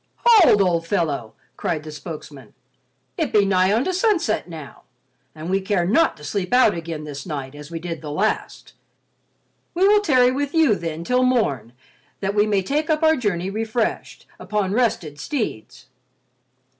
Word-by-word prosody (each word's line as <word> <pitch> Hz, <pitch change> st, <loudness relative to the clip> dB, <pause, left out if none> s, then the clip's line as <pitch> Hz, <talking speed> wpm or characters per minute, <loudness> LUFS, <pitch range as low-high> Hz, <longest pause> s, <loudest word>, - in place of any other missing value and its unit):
"Hold, 390 Hz, -, +6 dB
old 170 Hz, -3 st, 0 dB
fellow!" 150 Hz, -, -2 dB, 0.2 s
cried 155 Hz, -3 st, -2 dB
the 155 Hz, -, -8 dB
spokesman. 150 Hz, -2 st, -10 dB, 0.6 s
"It -, -, -1 dB
be 205 Hz, -2 st, +4 dB
nigh 190 Hz, -1 st, +3 dB
onto 250 Hz, -, +1 dB
sunset 360 Hz, -, 0 dB
now, 155 Hz, -4 st, -10 dB, 0.5 s
and 155 Hz, +1 st, -7 dB
we 190 Hz, +2 st, 0 dB
care 190 Hz, -2 st, 0 dB
not 315 Hz, -, +2 dB
to 150 Hz, -, -14 dB
sleep 190 Hz, +4 st, -3 dB
out 250 Hz, -4 st, +5 dB
again 165 Hz, -2 st, -6 dB
this 145 Hz, -2 st, -7 dB
night 140 Hz, -5 st, -6 dB
as 145 Hz, 0 st, -11 dB
we 170 Hz, -, -5 dB
did 165 Hz, -2 st, -6 dB
the 150 Hz, -, -7 dB
last. 190 Hz, +9 st, -2 dB, 1.0 s
We 375 Hz, +3 st, +4 dB
will 415 Hz, 0 st, +5 dB
tarry 255 Hz, -9 st, +4 dB
with 285 Hz, +3 st, -3 dB
you 315 Hz, -8 st, +4 dB
then 165 Hz, -3 st, -4 dB
till 250 Hz, +7 st, +1 dB
morn 145 Hz, -, 0 dB, 0.5 s
that 195 Hz, 0 st, -2 dB
we 210 Hz, +1 st, +2 dB
may 200 Hz, -2 st, +1 dB
take 300 Hz, -, -1 dB
up 310 Hz, 0 st, +1 dB
our 315 Hz, 0 st, +5 dB
journey 195 Hz, -, -2 dB
refreshed, 220 Hz, +2 st, -3 dB
upon 205 Hz, -2 st, -2 dB
rested 200 Hz, -, -1 dB
steeds." 220 Hz, -, -4 dB
195 Hz, 165 wpm, -22 LUFS, 160-250 Hz, 1.0 s, Hold